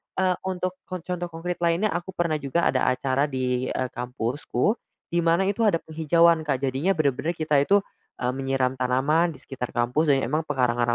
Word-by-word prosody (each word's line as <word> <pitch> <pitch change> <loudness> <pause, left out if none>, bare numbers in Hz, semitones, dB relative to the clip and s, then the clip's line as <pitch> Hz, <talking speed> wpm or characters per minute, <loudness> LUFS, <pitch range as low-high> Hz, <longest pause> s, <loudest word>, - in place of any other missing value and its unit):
eee, 185 -1 +2
untuk 185 -1 -1 0.2
kon 185 -3 -5
contoh 175 -1 -3
konkrit 170 +1 -5
lainnya, 170 +5 +1
aku 175 +2 -4
pernah 165 -3 0
juga 145 +5 -1
ada 130 - +1
acara 135 +2 +1
di, 130 -2 -1
eee, 130 - -2
kampusku, 125 - -1 0.4
di 170 - +2
mana 170 +2 +3
itu 200 +3 -1
ada 200 - +4
penghijauan, 165 +1 +3
Kak, 135 -2 0
jadinya 135 +9 +1
bener-bener 155 +2 0
kita 155 -3 +2
itu, 195 +8 +3 0.4
eee, 125 - +2
menyiram 135 -1 0
tanaman 145 +7 +2
di - - -14
sekitar 125 -3 -6
kampus 125 +7 +1
dan 135 - 0
emang 155 +6 -1
pekarangan 125 -4 +1
155 Hz, 180 wpm, -25 LUFS, 130-170 Hz, 0.4 s, ada